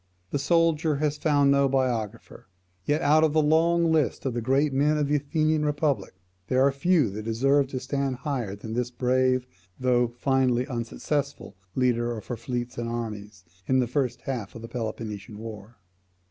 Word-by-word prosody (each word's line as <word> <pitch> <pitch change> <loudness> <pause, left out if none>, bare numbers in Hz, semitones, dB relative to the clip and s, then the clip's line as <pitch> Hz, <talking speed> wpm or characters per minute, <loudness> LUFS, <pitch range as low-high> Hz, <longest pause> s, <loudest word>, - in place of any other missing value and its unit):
The 145 - 0
soldier 160 0 +2
has 150 0 -1
found 145 -3 +3
no 140 0 +3
biographer. 120 -7 -2 0.4
Yet 150 +3 +1
out 155 +2 +5
of 155 -2 +3
the 155 - +4
long 165 +2 +3
list 155 -3 +1
of 130 - -1
the 120 - -2
great 135 +4 +2
men 150 +3 +2
of 150 -1 +1
the 150 +1 +2
Athenian 155 +1 0
republic, 150 -6 -1 0.3
there 130 +1 +3
are 140 - +4
few 140 - +2
that 105 +2 -5
deserve 135 +6 +2
to 130 -1 -4
stand 135 0 -2
higher 125 -7 -3
than 110 +2 -7
this 125 +1 -1
brave, 130 +1 +1 0.3
though 125 -1 +2
finally 125 0 +1
unsuccessful, 135 0 -3 0.2
leader 120 -2 +1
of 105 - -9
her 120 - -4
fleets 120 +1 -4
and 115 0 -3
armies 105 -4 -6 0.2
in 130 - +3
the 130 - +3
first 125 +1 -1
half 120 -7 -5
of 115 - -9
the - - -6
Peloponnesian 110 -3 -5
war. 110 0 -9
130 Hz, 175 wpm, -26 LUFS, 120-145 Hz, 0.4 s, out